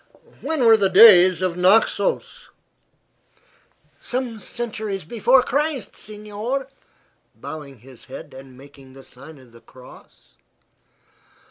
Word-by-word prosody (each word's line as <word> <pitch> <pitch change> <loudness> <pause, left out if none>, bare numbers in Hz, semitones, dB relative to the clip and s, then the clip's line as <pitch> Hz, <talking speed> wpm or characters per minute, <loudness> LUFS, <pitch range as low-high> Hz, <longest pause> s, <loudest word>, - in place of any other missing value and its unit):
"When 315 -6 -2
were 225 -1 +6
the 195 -2 +1
days 185 -2 +6
of 180 -2 -2
Naxos?" 225 - 0 1.5
"Some 245 -3 -5
centuries 215 -5 -6
before 240 +7 +2
Christ, 285 -1 -3
signor," 215 +5 -6 0.7
bowing 140 -6 -10
his 130 -1 -16
head - - -11
and 130 -1 -14
making 135 -1 -17
the 135 0 -15
sign 160 +3 -15
of 130 -3 -19
the 115 0 -18
cross. 130 -1 -19
200 Hz, 110 wpm, -21 LUFS, -, 1.5 s, were